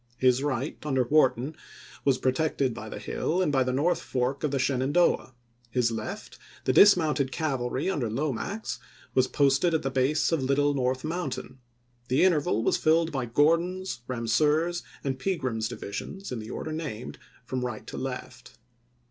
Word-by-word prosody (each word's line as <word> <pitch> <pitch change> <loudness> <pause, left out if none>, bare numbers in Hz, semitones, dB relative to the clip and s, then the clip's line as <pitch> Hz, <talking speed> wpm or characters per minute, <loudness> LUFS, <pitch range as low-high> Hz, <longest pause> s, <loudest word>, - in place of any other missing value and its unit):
His 130 0 +3
right, 140 0 -2
under 135 -4 +1
Wharton, 135 +1 +2 0.5
was 135 -2 +3
protected 130 -1 0
by 110 -1 -7
the - - -6
hill 155 - -2
and 180 -5 +2
by 135 -2 +3
the 130 - -1
north 150 +7 +1
fork 130 +3 -2
of 150 - +2
the 140 - -1
Shenandoah; 135 +1 +1 0.3
his 120 0 +1
left, 110 -1 -6 0.2
the - - +1
dis 205 -2 +8
mounted 150 -5 0
cavalry 135 -3 -1
under 145 -12 0
Lomax, 150 - -3 0.3
was 130 0 +3
posted 140 +4 +3
at 160 - 0
the 135 - -1
base 135 +5 +2
of 165 -4 +1
Little 140 +2 +2
North 130 -1 0
Mountain; 155 -5 -4 0.5
the 130 +6 +3
interval 150 - +2
was - - +2
filled 165 +1 +3
by 130 -5 -2
Gordon's, 170 +8 +1
Bamseur's, 150 +8 +1 0.2
and 130 -2 -2
Pegram's 130 - -1
divi 100 - -7
sions, 195 - -6
in 125 - -3
the 110 0 -8
order 155 - -5
named, 145 -7 -5 0.3
from 125 +1 -3
right 120 -3 -4
to - - -8
left. - - -6
135 Hz, 165 wpm, -27 LUFS, 125-155 Hz, 0.5 s, dis